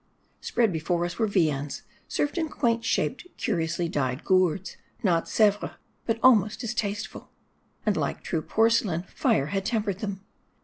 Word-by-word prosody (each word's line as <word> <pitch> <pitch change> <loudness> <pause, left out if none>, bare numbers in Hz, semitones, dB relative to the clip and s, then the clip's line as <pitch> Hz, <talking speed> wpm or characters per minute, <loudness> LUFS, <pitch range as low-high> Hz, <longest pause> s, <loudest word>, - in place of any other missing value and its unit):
Spread 225 -6 +1
before 170 +2 0
us 175 +3 -5
were 220 - +3
viands, 150 -8 0 0.2
served 290 +4 -1
in 320 -2 -1
quaint 230 -4 0
shaped, 225 - -1
curiously 170 -2 -1
dyed 130 -4 -1
gourds, 185 -1 +2 0.3
not 170 -5 +2
Sevres, 205 -2 +2 0.3
but 225 -1 +1
almost 225 -2 +5
as 235 0 -2
tasteful; 205 -2 -4 0.6
and - - +2
like - - -2
true 165 - -1
porcelain, 220 -5 +2
fire 140 -6 +1
had 195 -1 0
tempered 210 -3 -1
them. 200 -3 -4
195 Hz, 145 wpm, -27 LUFS, 170-225 Hz, 0.6 s, almost